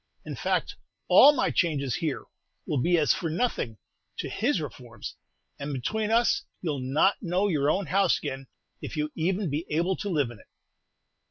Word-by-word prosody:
In - - -5
fact, - - -1 0.3
all 290 - +9
my 295 - 0
changes 140 -7 0
here 155 -5 -2 0.4
will 145 - 0
be 175 +5 +3
as 150 -3 +4
for 165 - -3
nothing 155 - -1 0.4
to - - -3
his 230 -1 0
reforms, 120 -6 -8 0.4
and 140 +1 -4
between 215 - -1
us 235 +4 +3 0.2
you 170 - -2
'll 140 - -4
not 135 +10 +2
know 185 +2 +1
your 150 -6 +1
own 195 +4 +1
house 190 +2 +3
again, 135 -2 -5 0.3
if - - -6
you 150 0 -1
even 180 +1 -1
be 150 +3 -1
able 170 +5 +1
to 205 - -4
live 145 -9 +1
in 120 - -12
it." - - -19
160 Hz, 180 wpm, -27 LUFS, 140-195 Hz, 0.4 s, all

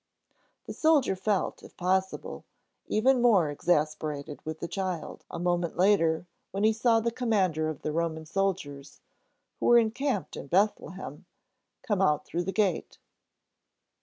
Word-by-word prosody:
The - - -6
soldier 305 -10 +3
felt, 195 +1 -1
if - - -15
possible, 190 +1 -1 0.4
even 250 +4 +3
more 195 -11 +4
exasperated 150 -2 -1
with 160 0 -5
the 170 - -4
child 185 -2 -4
a - - -6
moment 175 -1 -1
later, 175 -4 +3 0.2
when 195 +2 -3
he 220 +1 +5
saw 230 0 +3
the 230 +1 -1
commander 190 -10 0
of 155 - -7
the 155 - -1
Roman 160 0 -2
soldiers, 155 -6 -3 0.6
who - - 0
were 240 - +7
encamped 235 -1 0
in - - -7
Bethlehem, 190 +1 -1 0.6
come 205 -6 0
out 150 -6 +2
through 175 +1 -3
the 190 - -1
gate. 195 -5 0
185 Hz, 140 wpm, -28 LUFS, 160-215 Hz, 0.6 s, were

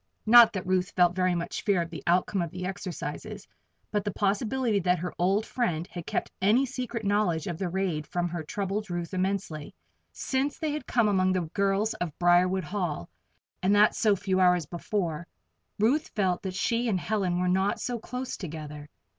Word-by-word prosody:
Not 235 0 +9
that 190 -3 -4
Ruth 185 0 +1
felt 175 -1 +4
very 185 -1 +2
much 170 0 -3
fear 200 -3 +2
of 170 - -10
the 165 - -6
outcome 180 +2 +2
of 170 - -2
the 180 +2 -6
exercises; 190 -1 -6 0.4
but 210 -2 0
the 205 - -1
possibility 215 +3 0
that 180 0 +2
her 175 +1 -4
old 195 +5 +2
friend 175 -10 -1
had 175 -2 -7
kept - - -2
any 220 +8 +4
secret 245 -4 -4
knowledge 200 -6 +1
of 170 -2 -4
the 190 -3 -1
raid 175 -5 -2
from 175 +2 -1
her 170 -1 -4
troubled 200 +5 -3
Ruth 175 0 -4
immensely. 185 -5 -2 0.4
Since 270 +2 -1
they 310 -2 -2
had 300 +1 -5
come 235 -3 +3
among 185 -2 +2
the 185 - +1
girls 200 +2 +1
of 170 -4 -5
Briarwood 180 +2 +3
Hall 175 - -3 0.5
and 195 +2 +3
that 210 +1 +5
so 210 -2 +3
few 190 0 -1
hours 180 -3 +4
before 170 -1 -3 0.5
Ruth 245 +9 +2
felt 185 -4 +1
that 190 -1 -5
she 230 +5 0
and 190 -4 +1
Helen 190 -3 -1
were 180 - +1
not 190 +2 +1
so 245 -1 -3
close 250 +3 -5
together. 150 -3 -7
190 Hz, 190 wpm, -28 LUFS, 175-210 Hz, 0.5 s, Not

